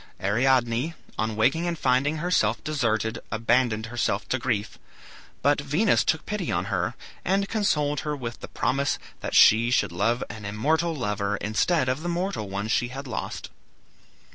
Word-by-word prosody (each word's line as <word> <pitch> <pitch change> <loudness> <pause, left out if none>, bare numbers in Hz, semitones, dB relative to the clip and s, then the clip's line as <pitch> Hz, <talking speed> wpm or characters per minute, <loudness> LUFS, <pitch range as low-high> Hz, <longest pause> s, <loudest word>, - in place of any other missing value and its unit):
Ariadne, 120 - +1 0.2
on 110 0 -1
waking 135 +11 +2
and 170 -1 -2
finding 140 +3 +2
herself 155 -10 +1
deserted, 115 -7 0
abandoned 115 0 +1
herself 115 -3 -1
to 130 - 0
grief. 115 -4 -2 0.6
But - - +3
Venus - - +2
took - - 0
pity - - -3
on - - 0
her, - - -1 0.3
and 195 +2 +1
consoled 150 -10 +1
her 150 +1 -2
with 120 -4 -6
the - - -8
promise 140 +2 0 0.2
that - - -4
she 115 +2 +7
should 125 - +2
have 115 +8 0
an 110 -2 -9
immortal 155 +12 0
lover, 105 -5 -1
instead 130 - +1
of 130 +4 -1
the 175 - -3
mortal 175 - -2
one 100 +2 -3
she 120 +2 +1
had 135 +3 -7
lost. 125 -4 -5
125 Hz, 160 wpm, -26 LUFS, 110-150 Hz, 0.6 s, she